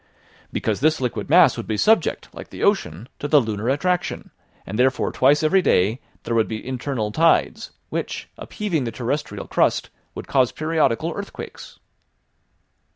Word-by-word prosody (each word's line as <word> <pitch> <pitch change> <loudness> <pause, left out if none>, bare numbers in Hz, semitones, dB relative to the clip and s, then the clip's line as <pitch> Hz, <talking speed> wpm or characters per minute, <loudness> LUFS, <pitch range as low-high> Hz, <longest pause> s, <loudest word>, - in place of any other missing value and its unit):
"Because 105 -2 -1
this 155 +3 +2
liquid 125 -2 -3
mass - - +6
would - - -6
be 110 - -1
subject, 220 - +2
like - - -10
the - - -7
ocean, 110 - 0
to 145 - -3
the 150 0 +5
lunar 110 -1 -2
attraction, 180 +6 -1 0.3
and 105 +4 -5
therefore 130 +1 +2
twice 145 +4 +3
every 185 +5 +4
day 110 - +2 0.2
there 115 - -3
would 115 -1 +2
be 110 +2 -6
internal 125 -4 -3
tides, 165 +8 +2 0.2
which, - - -4
upheaving 175 - -3
the 115 - -3
terrestrial 130 +6 -3
crust, - - +1 0.2
would - - -7
cause 130 -3 +2
periodical 160 -1 0
earthquakes!" 200 0 -8
130 Hz, 155 wpm, -22 LUFS, 115-160 Hz, 0.3 s, mass